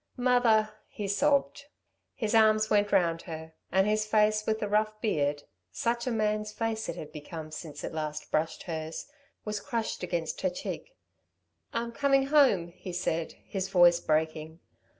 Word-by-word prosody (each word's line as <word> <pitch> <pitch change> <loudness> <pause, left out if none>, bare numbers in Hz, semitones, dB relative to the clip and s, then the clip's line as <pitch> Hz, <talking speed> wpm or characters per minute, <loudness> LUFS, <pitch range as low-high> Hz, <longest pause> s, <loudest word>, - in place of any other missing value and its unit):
"Mother!" 240 -4 +3 0.2
he 205 - -5
sobbed. 280 +6 +1 0.5
His 220 -4 -2
arms 215 -1 +4
went 205 -1 +3
round 170 -4 +2
her, 160 0 -7 0.2
and 190 +1 +4
his 215 +1 +2
face 215 0 +2
with 220 0 +1
the 210 - -2
rough 215 +1 +1
beard 145 -9 0 0.3
such 235 +1 -1
a - - +1
man's 215 -1 0
face 225 0 -2
it - - -3
had 150 - -8
become 155 +1 -8
since 155 -2 -8
it - - -4
last 150 -1 -4
brushed 160 +1 -1
her's 160 -1 -5 0.4
was 210 -1 -2
crushed 225 +2 -3
against 170 -3 -3
her 185 - +2
cheek. 475 - -6 0.8
"I'm 235 0 -2
coming 275 +2 +3
home," 245 - +5
he 180 +1 -9
said, 165 -2 -1
his 195 -1 -3
voice 175 -2 +6
breaking. 155 0 -1
205 Hz, 160 wpm, -29 LUFS, 165-220 Hz, 0.8 s, voice